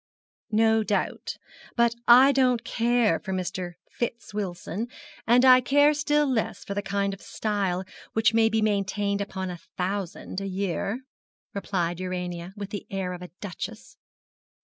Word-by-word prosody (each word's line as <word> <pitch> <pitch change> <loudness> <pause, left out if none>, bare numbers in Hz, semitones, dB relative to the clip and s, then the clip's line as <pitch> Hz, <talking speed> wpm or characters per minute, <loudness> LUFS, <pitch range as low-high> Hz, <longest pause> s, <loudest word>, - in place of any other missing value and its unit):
'No 220 0 +4
doubt. 205 -2 -2 0.4
But 235 -1 +4
I 255 +3 +9
don't 255 -3 +3
care 235 -1 +2
for 190 - -5
Mr. 180 -1 -3 0.2
Fitz 235 -2 -4
Wilson, 200 +2 -3 0.4
and 245 +3 +6
I 255 -1 +8
care 290 +4 +5
still 295 0 +2
less 225 -6 -1
for 200 - -4
the 205 - -1
kind 200 0 -1
of 195 - -10
style 195 -4 -1 0.3
which 225 0 +4
can 225 0 +4
be 220 0 +1
maintained 200 -1 0
upon 190 -2 -4
a 175 - -8 0.2
thousand 190 0 -3
a 195 - -3
year,' 195 +4 -2 0.5
replied 175 -4 -2
Urania, 180 -1 -4
with 200 -1 -6
the 205 - -5
air 190 -2 -2
of 180 - -8
a 180 - -8
duchess. 200 -5 -7
205 Hz, 150 wpm, -26 LUFS, 185-235 Hz, 0.5 s, I